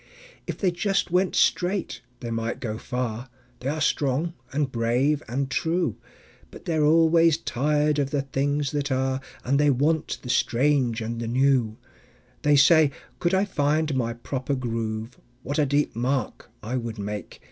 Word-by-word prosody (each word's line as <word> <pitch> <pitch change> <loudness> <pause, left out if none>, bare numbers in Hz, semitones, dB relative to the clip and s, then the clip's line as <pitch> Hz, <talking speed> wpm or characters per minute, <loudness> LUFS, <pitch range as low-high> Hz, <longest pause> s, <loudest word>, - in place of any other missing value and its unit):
If - - -4
they 190 -3 +1
just 195 +1 0
went 180 0 +2
straight 185 +1 +1 0.2
they 120 - -5
might 115 0 -2
go 110 -2 -4
far; 125 0 -4 0.3
They 130 - -3
are 155 +2 -2
strong 150 +2 0 0.2
and 140 -1 -1
brave 125 +6 +1
and 135 +4 -1
true; 165 - 0 0.5
But - - -13
they're 160 -3 +1
always 165 +1 +5
tired 150 +1 +1
of 140 -1 0
the 140 -1 -1
things 140 +1 -1
that 145 -1 -2
are, 130 0 0 0.2
And 140 +3 +1
they 145 0 +4
want 145 +4 +1
the 125 - -7
strange 125 -2 +2
and 115 +1 -4
new. 120 -1 +1 0.6
They 150 0 +4
say: 155 +2 +6 0.3
"Could 175 +2 +1
I 190 +2 +2
find 155 -4 0
my 120 -3 -1
proper 130 +3 -3
groove, 115 -1 -4 0.2
What 145 +3 -2
a 145 - +3
deep 145 -1 +1
mark 125 0 -2
I 120 +4 -2
would 115 -2 -4
make!" 105 -2 -6
140 Hz, 160 wpm, -25 LUFS, 120-150 Hz, 0.6 s, say